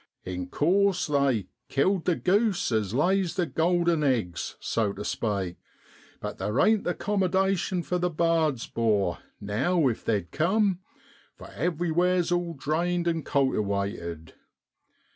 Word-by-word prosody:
In 90 -1 -4
course 185 - +2
they 140 -8 +1
' 120 - -53
killed 180 +6 +1
the 180 - +2
goose 195 - +1
as 110 -4 0
lays 180 - +1
the 180 -3 +1
golden 170 +2 +1
eggs,' 115 - -1
so 110 -3 0
tu - - -6
spake; 100 -5 -2 0.6
but - - -6
there 105 +6 -1
ain't 220 -1 +3
the 180 - 0
'commadation 190 -2 0
for 180 +1 -1
the 180 0 +1
bards, 160 -6 +1
'bor, 105 -6 0 0.2
now 135 - +1
if 115 - -4
they'd 100 -6 -1
cum, 190 +3 +1 0.6
for - - -12
everywhere's 175 +3 0
all 175 -1 -1
drained 170 +5 -1
an' 165 -1 0
cultiwated. 100 - -1
160 Hz, 135 wpm, -27 LUFS, 110-180 Hz, 0.6 s, ain't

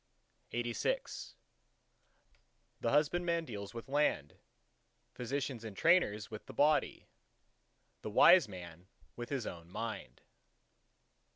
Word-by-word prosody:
LXXXVII 120 - -2 1.5
The 115 - +1
husbandman 170 +4 +2
deals 100 -4 -7
with 115 - -7
land; 135 - 0 0.7
physicians 130 -1 -3
and 110 -3 -8
trainers 115 - +3
with 110 - -8
the - - -10
body; 150 +3 +2 1.0
the - - -5
wise 170 - +7
man 90 -2 -10 0.3
with 120 0 -6
his 135 -5 -2
own 85 -1 -7
Mind. 100 - -6
120 Hz, 100 wpm, -34 LUFS, 105-150 Hz, 1.5 s, wise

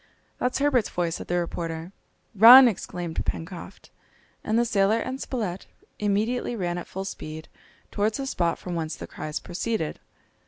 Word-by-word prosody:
"That's 250 0 0
Herbert's 275 -6 +2
voice," 170 -1 -2
said - - -9
the 175 - 0
reporter. 165 0 -4 0.4
"Run!" 240 +5 +10
exclaimed 175 -6 -3
Pencroft. 170 +2 -6 0.5
And 220 - 0
the 240 - +3
sailor 210 -2 +2
and 260 +3 -4
Spilett 205 -8 -4 0.3
immediately 215 +4 0
ran 175 -4 -2
at - - -9
full 190 +1 -5
speed 155 -4 -7 0.4
towards 210 +1 0
the 275 - -3
spot 175 -10 0
from 180 - -6
whence 160 -2 -3
the - - -8
cries 155 0 -5
proceeded. 180 -2 -3
195 Hz, 155 wpm, -25 LUFS, 170-230 Hz, 0.5 s, Run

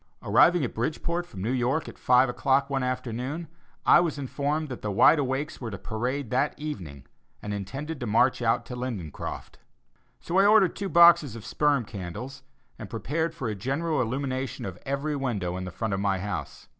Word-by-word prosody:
Arriving 175 -4 +4
at - - -5
Bridgeport 170 +8 -2
from 95 - -8
New 115 - 0
York 130 +4 0
at - - -9
five 125 +1 +5
o'clock 135 +3 +1
one 135 -1 0
afternoon, 130 +5 -3 0.4
I - - +7
was 170 -3 0
informed 145 +3 -2
that 125 - -6
the 105 - -3
Wide 125 +10 +5
Awakes 135 +2 -2
were 120 - -4
to 100 - -6
parade 120 +6 -3
that 135 +4 +1
evening 85 - -7 0.3
and 105 - -5
intended 135 +10 -5
to 120 - -4
march 115 +4 +3
out 115 0 +1
to 125 - -7
Lindencroft. 115 - -6 0.6
So 175 +3 0
I 200 - +6
ordered 210 -4 +5
two 200 -1 -3
boxes 170 -8 +6
of 115 - -9
sperm 145 -5 +1
candles, 105 +8 -7 0.4
and 105 - -7
prepared 160 +8 -2
for 125 - -4
a 110 - -1
general 140 - -1
illumination 130 +2 -3
of 95 -3 -7
every 140 +2 -1
window 105 -10 -2
in 95 0 -4
the - - -5
front 110 +2 -3
of 95 - -1
my 100 -1 +1
house. 75 -8 -5
130 Hz, 190 wpm, -27 LUFS, 110-150 Hz, 0.6 s, I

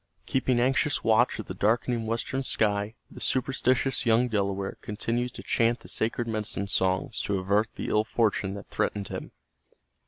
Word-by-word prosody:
Keeping 130 -2 +1
anxious 135 +4 +2
watch 115 +2 +3
of 110 - -6
the - - -6
darkening 115 +3 +1
western 115 +4 -2
sky, 105 -3 0 0.2
the - - -10
superstitious 130 +1 +1
young 120 +1 +3
Delaware 100 -2 -2
continued 115 +3 -2
to - - -8
chant 115 +1 +1
the - - -13
sacred 115 +1 0
medicine 105 -2 0
songs 95 +2 +1
to 100 - -1
avert 100 +4 +1
the - - -4
ill 105 - +3
fortune 110 -4 0
that 100 - -9
threatened 100 -2 -1
him. - - -6
110 Hz, 160 wpm, -27 LUFS, 100-120 Hz, 0.2 s, watch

